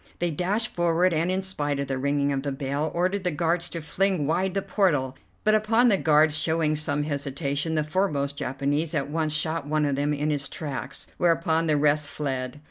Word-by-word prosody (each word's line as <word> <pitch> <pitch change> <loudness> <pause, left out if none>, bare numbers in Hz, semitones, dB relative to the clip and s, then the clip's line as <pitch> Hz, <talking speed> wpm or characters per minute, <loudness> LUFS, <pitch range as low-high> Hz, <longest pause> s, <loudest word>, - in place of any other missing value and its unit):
They 175 -1 -1
dashed 200 +8 0
forward, 175 +1 +2
and, 165 +2 +1
in 190 +1 0
spite 145 -7 -2
of 140 - -1
the 135 -1 -2
ringing 140 +1 +1
of 135 - -1
the 140 0 -3
bell, 140 +3 -2
ordered 185 +3 0
the 180 - +1
guards 170 +2 0
to 165 -2 -6
fling 185 -1 0
wide 180 +5 0
the 195 - 0
portal, 145 -10 +1 0.3
but 215 - +4
upon 225 +3 +4
the 200 - +4
guards 155 -2 +4
showing 160 0 +1
some 145 -1 0
hesitation, 145 +1 -2
the 155 - +1
foremost 150 -4 -1
Japanese 145 +5 -1
at 145 -1 -1
once 155 -1 0
shot 155 0 -1
one 155 0 +1
of 140 -1 0
them 145 +2 0
in 150 +1 0
his 140 -2 -1
tracks, 145 -5 -5
whereupon 165 -1 +2
the 150 -1 +3
rest 145 0 +2
fled. 130 -2 -3
155 Hz, 205 wpm, -26 LUFS, 145-175 Hz, 0.3 s, but